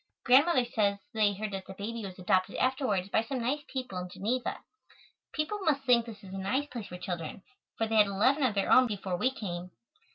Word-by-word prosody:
Grandmother 260 Hz, +1 st, +5 dB
says 205 Hz, -4 st, +1 dB, 0.2 s
they 210 Hz, -2 st, +3 dB
heard 210 Hz, +1 st, -4 dB
that 190 Hz, -1 st, -5 dB
the 190 Hz, -, -8 dB
baby 225 Hz, +3 st, -5 dB
was 190 Hz, -2 st, -7 dB
adopted 185 Hz, 0 st, +1 dB
afterwards 255 Hz, -8 st, 0 dB
by 220 Hz, -, +3 dB
some 255 Hz, +4 st, -4 dB
nice 260 Hz, +5 st, -1 dB
people 255 Hz, -8 st, -4 dB
in 180 Hz, 0 st, -6 dB
Geneva. 240 Hz, +7 st, -2 dB, 0.7 s
People 315 Hz, +7 st, -2 dB
must 305 Hz, -7 st, +1 dB
think 240 Hz, -3 st, +4 dB
this 215 Hz, -3 st, -10 dB
is 190 Hz, -1 st, -10 dB
a 195 Hz, -, -4 dB
nice 230 Hz, +10 st, 0 dB
place 235 Hz, -5 st, -6 dB
for 180 Hz, -, -8 dB
children, 180 Hz, 0 st, -5 dB, 0.3 s
for 225 Hz, -, +1 dB
they 220 Hz, 0 st, 0 dB
had 210 Hz, -1 st, +7 dB
eleven 230 Hz, +9 st, +2 dB
of 250 Hz, -6 st, +2 dB
their 195 Hz, -, +1 dB
own 255 Hz, 0 st, +7 dB
before 195 Hz, -4 st, -3 dB
we 250 Hz, -, +2 dB
came. 180 Hz, -8 st, -5 dB
215 Hz, 215 wpm, -30 LUFS, 195-255 Hz, 0.7 s, had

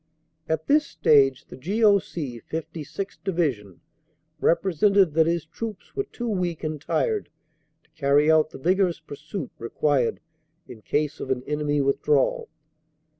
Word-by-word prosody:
At 160 Hz, 0 st, -1 dB
this 300 Hz, +1 st, +3 dB
stage 135 Hz, -3 st, +3 dB
the -, -, -11 dB
G.O.C. 175 Hz, -, +1 dB
56th. 165 Hz, +4 st, -5 dB
Divi 175 Hz, -7 st, +1 dB
sion 105 Hz, -5 st, -17 dB, 0.6 s
represented 190 Hz, +1 st, +3 dB
that 160 Hz, 0 st, +4 dB
his 170 Hz, -1 st, 0 dB
troops 210 Hz, +4 st, -8 dB
were 405 Hz, -, -1 dB
too 240 Hz, -, -6 dB
weak 180 Hz, -7 st, -2 dB
and 155 Hz, -2 st, -3 dB
tired 435 Hz, -, -1 dB, 0.5 s
to -, -, -34 dB
carry 150 Hz, 0 st, +3 dB
out 155 Hz, -1 st, +4 dB
the -, -, -10 dB
vigorous 180 Hz, +3 st, +1 dB
pursuit 155 Hz, 0 st, -7 dB
required 130 Hz, +1 st, 0 dB, 0.5 s
in 115 Hz, -3 st, -11 dB
case 150 Hz, +5 st, -1 dB
of -, -, -6 dB
an 130 Hz, -1 st, -1 dB
enemy 150 Hz, 0 st, 0 dB
withdrawal. 140 Hz, 0 st, +1 dB
155 Hz, 135 wpm, -25 LUFS, 140-185 Hz, 0.6 s, that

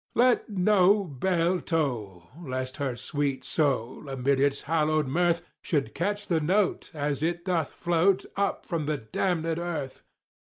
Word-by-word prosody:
Let 245 Hz, 0 st, +3 dB
no 200 Hz, 0 st, +4 dB
bell 175 Hz, +3 st, 0 dB
toll!—lest 130 Hz, -, -3 dB
her 140 Hz, -4 st, -2 dB
sweet 140 Hz, +2 st, -2 dB
soul, 135 Hz, -2 st, -1 dB
amid 135 Hz, +1 st, +1 dB
its 140 Hz, 0 st, +1 dB
hallowed 155 Hz, 0 st, +1 dB
mirth, 170 Hz, +5 st, +1 dB, 0.2 s
Should 145 Hz, -5 st, -1 dB
catch 205 Hz, +5 st, -2 dB
the 165 Hz, -3 st, +1 dB
note, 185 Hz, +5 st, +1 dB
as 145 Hz, -1 st, -1 dB
it 170 Hz, +2 st, -1 dB
doth 170 Hz, -5 st, 0 dB
float 175 Hz, +3 st, +2 dB
up 200 Hz, 0 st, -1 dB
from 160 Hz, -4 st, -2 dB
the 150 Hz, -1 st, 0 dB
damned 160 Hz, -, -1 dB
Earth. 165 Hz, -5 st, -3 dB
160 Hz, 135 wpm, -27 LUFS, 140-180 Hz, 0.2 s, no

